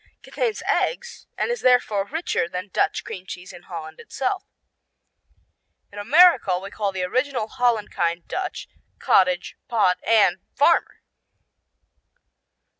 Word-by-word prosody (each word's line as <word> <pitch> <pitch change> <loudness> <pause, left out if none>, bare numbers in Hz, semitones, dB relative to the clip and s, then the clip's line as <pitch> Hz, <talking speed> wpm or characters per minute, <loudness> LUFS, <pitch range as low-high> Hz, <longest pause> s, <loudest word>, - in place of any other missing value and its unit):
Contains 460 -4 -3
eggs, 480 -1 -1
and - - -1
is 480 - -3
therefore 220 -6 +2
richer 315 - -2
than 180 +3 -6
Dutch - - 0
cream 185 0 -8
cheese 180 0 -8
in - - -12
Holland 160 -3 -9
itself. 375 +8 -3 1.5
In 205 - -9
America 270 - +5
we 195 +2 -8
call 205 -2 -2
the 190 -1 -3
original 255 +4 -1
Holland 230 -2 0
kind 170 0 -2
Dutch, 375 - -4 0.3
cottage, 180 -2 +2
pot, 205 -6 +2
and 205 -5 +3 0.2
farmer. 295 +5 +2
205 Hz, 120 wpm, -23 LUFS, 180-280 Hz, 1.5 s, America